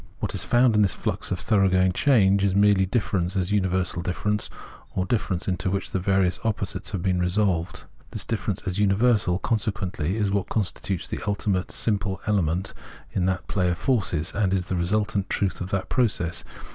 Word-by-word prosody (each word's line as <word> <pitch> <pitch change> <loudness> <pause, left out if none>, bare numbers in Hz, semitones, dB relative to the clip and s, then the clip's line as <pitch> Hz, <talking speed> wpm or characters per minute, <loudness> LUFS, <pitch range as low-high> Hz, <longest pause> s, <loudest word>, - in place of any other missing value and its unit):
What - - -3
is - - -2
found 120 -2 +3
in 105 - +4
this 100 -3 +2
flux - - -3
of - - -2
thoroughgoing 95 -3 +3
change 100 -4 +3
is 95 -1 +2
merely 100 -2 +4
difference 95 -4 -1
as 95 0 0
universal 95 -3 0
difference, 105 +4 -2 0.5
or 90 - 0
difference 95 -4 -1
into 90 -1 -1
which 100 +1 -2
the 95 - 0
various 95 -1 +1
opposites 100 -3 -2
have 95 -5 -3
been 95 -2 +1
resolved. 90 -1 0 0.3
This - - -4
difference - - -2
as 95 +1 -2
universal, 105 -2 +3
consequently, 100 -5 -1
is 105 -3 0
what 100 -1 -1
constitutes 100 -3 -2
the - - -4
ultimate 100 -2 0
simple 100 -3 -1
element 95 -2 0 0.4
in 90 -1 0
that 95 0 -2
play 90 -3 +1
of 85 - -1
forces, 90 - 0
and 95 -2 +1
is 95 -1 -2
the 95 - 0
resultant 100 +2 0
truth 95 -2 -1
of 90 - -4
that 95 -1 -2
process. 95 -9 0
95 Hz, 180 wpm, -25 LUFS, 90-105 Hz, 0.5 s, in